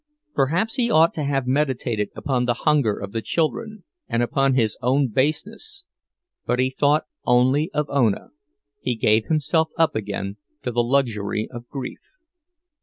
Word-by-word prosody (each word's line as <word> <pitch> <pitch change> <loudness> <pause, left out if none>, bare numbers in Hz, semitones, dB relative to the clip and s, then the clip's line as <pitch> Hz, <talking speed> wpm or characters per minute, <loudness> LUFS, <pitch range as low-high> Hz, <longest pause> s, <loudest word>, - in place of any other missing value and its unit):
Perhaps 170 +11 +1
he 240 -2 +2
ought 165 -5 +5
to 155 - -3
have 135 -2 0
meditated 130 -6 0
upon 130 -4 0
the 120 -1 +1
hunger 145 -9 +3
of 100 -1 -6
the 115 - -2
children, 195 - -2 0.2
and 115 +1 +1
upon 135 +2 +2
his 115 -4 +2
own 130 +2 +2
baseness; 205 - -2 0.6
but 125 - 0
he 130 +1 +1
thought 145 +3 +2 0.2
only 130 +5 +3
of 150 -1 -1
Ona, 120 -8 +1 0.5
he 125 - -1
gave 110 0 +3
himself 160 +1 +1
up 165 -1 +3
again 100 -1 -3 0.3
to 125 - -2
the 120 0 +2
luxury 115 -5 0
of 120 0 -9
grief. 130 -1 -6
135 Hz, 155 wpm, -23 LUFS, 120-150 Hz, 0.6 s, ought